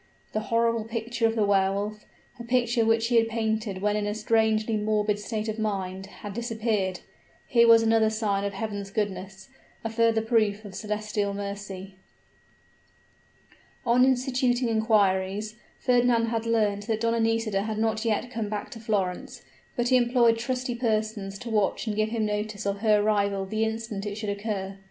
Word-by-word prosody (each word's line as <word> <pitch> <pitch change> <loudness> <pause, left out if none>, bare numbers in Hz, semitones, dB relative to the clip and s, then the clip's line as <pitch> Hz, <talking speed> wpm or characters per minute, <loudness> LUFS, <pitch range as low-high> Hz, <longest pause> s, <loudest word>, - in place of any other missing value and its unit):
The 215 - +1
horrible 230 -1 +2
picture 230 +1 -1
of 225 - -2
the 215 -2 +2
Wehr 195 -1 +3
Wolf, 210 +2 -4 0.3
a - - -6
picture 240 -1 +2
which 225 +1 +2
he 240 - +4
had 225 0 +4
painted 220 -3 -2
when 210 0 +2
in 210 -1 -1
a 210 - -2
strangely 220 0 +1
morbid 210 -1 0
state 215 +1 -3
of 220 0 -3
mind 195 -3 -3
had 205 0 -9
disappeared. 220 -5 -1 0.4
Here 235 -1 +4
was 230 0 +7
another 225 -1 +4
sign 210 -2 -1
of 200 0 -2
Heaven's 200 -1 -4
goodness 190 -2 -4 0.3
a 225 - -3
further 225 -1 +2
proof 215 -2 +1
of 200 - -9
celestial 210 0 -2
mercy. 200 -1 -6 1.9
On 240 +2 +4
instituting 255 -1 +2
inquiries, 210 -2 +1 0.3
Fernand 245 -2 +3
had 230 0 -2
learnt 210 -3 +1
that 220 -1 -1
Donna 230 0 +1
Nisida 225 -3 +1
had 215 +1 -3
not 220 0 0
yet 230 +2 -1
come 225 -3 -3
back 210 -1 -4
to 230 - -8
Florence: 200 -5 -2 0.3
but 240 0 0
he 255 - +6
employed 240 -2 +3
trusty 250 +1 -2
persons 215 -4 -1
to 235 +2 -7
watch 210 0 +1
and 215 -2 -2
give 215 +1 +1
him 225 -1 -1
notice 210 -1 -3
of 200 0 -1
her 210 -1 +3
arrival 200 -2 +1
the 215 +3 0
instant 220 -2 -4
it 200 - -4
should 215 -1 -4
occur. 200 -2 -4
215 Hz, 170 wpm, -26 LUFS, 205-230 Hz, 1.9 s, was